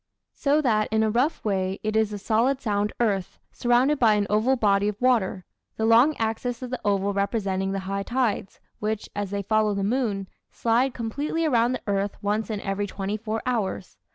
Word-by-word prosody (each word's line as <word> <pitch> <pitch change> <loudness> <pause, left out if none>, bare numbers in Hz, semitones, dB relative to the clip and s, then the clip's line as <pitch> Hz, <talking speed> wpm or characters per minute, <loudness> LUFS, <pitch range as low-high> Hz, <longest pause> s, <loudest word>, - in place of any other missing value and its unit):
So 290 +2 +2
that 215 -5 +2
in 220 0 +2
a 215 - +1
rough 255 +7 0
way 190 -1 -1
it 215 0 -1
is 220 -1 +2
a 205 - -4
solid 230 +6 +1
sound 210 -4 0
earth, 200 -6 0
surrounded 250 +4 +2
by 220 -3 +5
an 205 -1 +1
oval 220 +6 +3
body 205 -4 +2
of 210 -1 -3
water: 225 -7 +1 0.3
the 220 - 0
long 240 +7 +5
axis 230 +2 -2
of 250 - -6
the 255 - -4
oval 200 0 +1
representing 195 -1 -1
the 195 0 -2
high 195 +1 -2
tides, 235 -3 -1 0.2
which, 215 0 -3
as 205 -1 -2
they 200 0 -3
follow 215 0 +2
the 200 - -1
moon, 205 -3 -1 0.2
slide 240 +3 +1
completely 285 +8 -2
around 245 -4 +3
the - - -5
earth 200 0 -1
once 210 +2 -1
in 210 -2 -3
every 200 +1 -2
twenty 195 +1 -3
four 220 +1 -4
hours. 220 -6 -2
215 Hz, 195 wpm, -25 LUFS, 200-240 Hz, 0.3 s, by